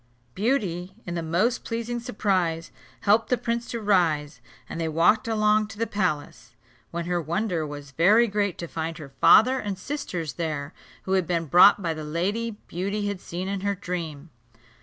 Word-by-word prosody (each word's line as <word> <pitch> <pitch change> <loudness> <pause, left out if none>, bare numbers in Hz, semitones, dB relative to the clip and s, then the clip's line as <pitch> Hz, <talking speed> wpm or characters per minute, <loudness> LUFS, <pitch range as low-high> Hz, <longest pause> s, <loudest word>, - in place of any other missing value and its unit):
Beauty, 190 -6 -1
in 175 - -4
the 170 - -2
most 180 +10 0
pleasing 235 +1 -3
surprise, 185 -8 -1 0.3
helped 215 +2 +3
the 250 - +2
prince 235 0 -2
to 235 - -3
rise, 165 -8 +1 0.3
and 165 - -5
they 165 - 0
walked 170 +8 +3
along 215 -1 +2
to 220 - -11
the 230 - 0
palace, 185 -10 -3 0.3
when 170 0 -4
her 175 0 0
wonder 170 0 -1
was 145 -1 -8
very 200 - +5
great 205 -4 -1
to 170 - -5
find 165 0 -4
her 145 -3 -9
father 255 +4 +6
and 205 -5 -4
sisters 180 - -4
there, 155 -3 -4 0.3
who 190 - -5
had 190 -3 +2
been 170 -2 0
brought 180 +6 +6
by 165 -2 0
the 155 -1 -6
lady 205 +9 -2
Beauty 200 +4 -2
had 200 -2 -5
seen 180 +2 -5
in 195 -1 -3
her 200 0 0
dream. 170 -5 -5
185 Hz, 180 wpm, -25 LUFS, 165-215 Hz, 0.3 s, father